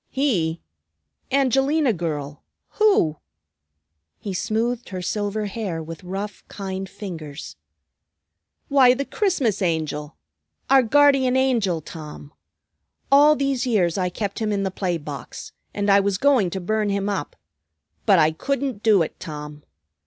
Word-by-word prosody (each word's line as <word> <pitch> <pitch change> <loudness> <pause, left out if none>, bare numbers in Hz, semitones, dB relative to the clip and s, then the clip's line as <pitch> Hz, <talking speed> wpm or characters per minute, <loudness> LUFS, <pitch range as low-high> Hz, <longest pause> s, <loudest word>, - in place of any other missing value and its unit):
"He? 185 - 0 0.7
Angelina 270 +1 +2
girl, 150 -5 -4 0.3
who?" 390 - +2 1.0
He 195 - -6
smoothed 230 +5 -1
her 185 -2 -5
silver 210 +2 -2
hair 195 -6 -4
with 165 +1 -9
rough, 195 +3 -5
kind 190 -1 -5
fingers. 160 -8 -8 1.1
"Why, 260 -3 +5
the 280 +2 -3
Christmas 305 - 0
Angel; 155 -4 -2 0.5
our 270 -1 +7
Guardian 265 0 +4
Angel, 230 -11 +1
Tom. 150 -1 -10 0.8
All 295 +2 +7
these 275 -2 -1
years 185 -8 +2
I 185 -2 0
kept 200 +2 -4
him 215 -1 -1
in 200 -1 0
the 190 - -1
play 180 -2 -1
box, 145 -2 -8 0.2
and 205 0 -2
I 200 0 +6
was 200 -1 0
going 255 -6 +3
to 190 - -4
burn 215 +3 -1
him 200 0 -1
up. 195 -8 -3 0.7
But - - +6
I 155 +1 +4
couldn't 265 - -3
do 210 -6 +4
it, - - -7
Tom. 150 -2 -8
200 Hz, 135 wpm, -23 LUFS, 170-255 Hz, 1.1 s, our